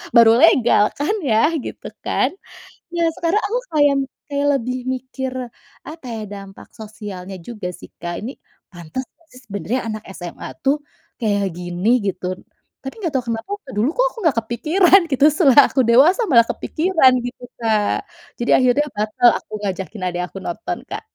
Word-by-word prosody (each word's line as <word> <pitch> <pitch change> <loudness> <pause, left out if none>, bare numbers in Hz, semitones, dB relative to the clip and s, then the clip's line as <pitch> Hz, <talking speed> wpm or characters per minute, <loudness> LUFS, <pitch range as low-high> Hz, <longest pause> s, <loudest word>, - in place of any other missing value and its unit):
baru 230 -1 +8
legal 240 -9 +5
kan 295 +8 0
ya 270 +2 +2
gitu - - -9 0.2
kan. - - 0 0.6
Iya, 340 -1 0
sekarang 345 +5 +1
aku 475 +4 -1
kayak 290 -2 +4 0.3
kayak 285 0 0
lebih 250 +2 -3 0.2
mikir 260 0 -5 0.5
apa 315 -2 -10
ya, 220 - -5
dampak 195 -1 -10
sosialnya 205 -4 -8
juga 210 0 -6
sih - - -12
Kak, 175 0 -4
ini 230 +5 -5 0.4
pantes 175 +7 -6
ngga 335 - -33
sih 255 - -13
sebenarnya 200 +5 -2
anak 215 0 -6
SMA 175 -2 -8 0.2
tuh 275 +2 +3 0.4
kayak 205 -4 0
gini 175 +3 -2 0.2
gitu. 185 -2 -2 0.6
Tapi 270 - -5
nggak 335 -6 -2
tahu 250 - -3
kenapa 225 - -6
waktu 290 -10 -13
dulu 245 - +2
kok - - +4
aku - - -27
nggak 325 - +2
kepikiran 340 - +4
gitu 275 0 +3
setelah 295 -6 +4
aku 265 - +1
dewasa 265 - +5
malah 235 -5 +6
kepikiran 320 -1 +2
gitu 245 0 -7
Kak. 215 -3 0 0.3
Jadi 240 - -3
akhirnya 255 +3 +4
batal 215 +4 +3
aku - - -41
ngajakin 195 0 -4
adik 180 -1 -2
aku - - -10
nonton 190 +6 -4
Kak. - - -6
240 Hz, 165 wpm, -20 LUFS, 205-285 Hz, 0.6 s, baru